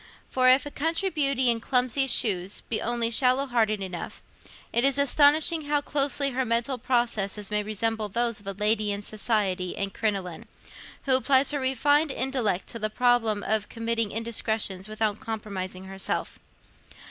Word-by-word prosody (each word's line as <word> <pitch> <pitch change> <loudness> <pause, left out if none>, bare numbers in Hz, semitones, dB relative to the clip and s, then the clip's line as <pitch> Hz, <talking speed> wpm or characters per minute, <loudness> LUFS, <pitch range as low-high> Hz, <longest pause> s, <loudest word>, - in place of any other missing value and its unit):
For 255 0 +3
if 260 +1 +4
a 290 - -6
country 330 +7 -1
beauty 275 -5 +2
in 230 - -2
clumsy 255 +3 +1
shoes 195 -6 +2
be 225 - -3
only 235 0 0
shallow 255 +3 +3
hearted 220 -5 0
enough, 180 -3 -7 0.5
it 235 - +3
is 275 0 +2
astonishing 295 +3 +3
how 295 0 +1
closely 280 -1 +1
her 260 +1 -1
mental 240 +2 -1
processes 220 -5 -1
may 210 0 +1
resemble 215 +1 -2
those 230 +1 -1
of 205 - -15
a 200 - -3
lady 210 +1 +1
in 200 0 -4
society 205 -4 -2
and 195 -1 -3
crinoline, 195 -6 -3 0.6
who 265 -2 +4
applies 265 +1 +3
her 290 - -2
refined 290 +4 +2
intellect 255 -9 -1
to 230 - -6
the 215 0 -1
problem 225 -3 +1
of 215 0 -1
committing 230 -2 -1
indiscretions 220 -3 -1
without 215 -1 -2
compromising 195 -4 -6
herself. 190 0 -4
230 Hz, 160 wpm, -26 LUFS, 210-265 Hz, 0.6 s, if